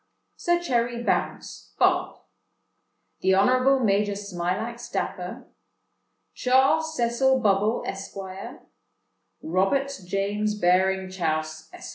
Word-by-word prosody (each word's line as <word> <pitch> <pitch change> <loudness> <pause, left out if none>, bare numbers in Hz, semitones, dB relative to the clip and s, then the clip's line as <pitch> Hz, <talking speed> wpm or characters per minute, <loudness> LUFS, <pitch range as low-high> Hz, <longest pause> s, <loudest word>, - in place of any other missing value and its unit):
"Sir 345 0 +1
Cherry 240 -7 -1
Bounce, - - -3
Bart. - - +2 1.0
"The 190 0 +3
Honourable 255 +6 +4
Major 205 0 +2
Smilax 200 +4 -4
Dapper. - - -4 0.9
"Charles 280 +5 +2
Cecil 245 +3 +2
Bubble, 210 0 +2
Esq. 195 +1 -6 1.3
"Robert 195 - +1 0.2
James 205 +2 -1
Baring 190 +1 +2
Chouse, 155 -3 -3
Esq. - - -10
210 Hz, 90 wpm, -25 LUFS, 190-255 Hz, 1.3 s, Honourable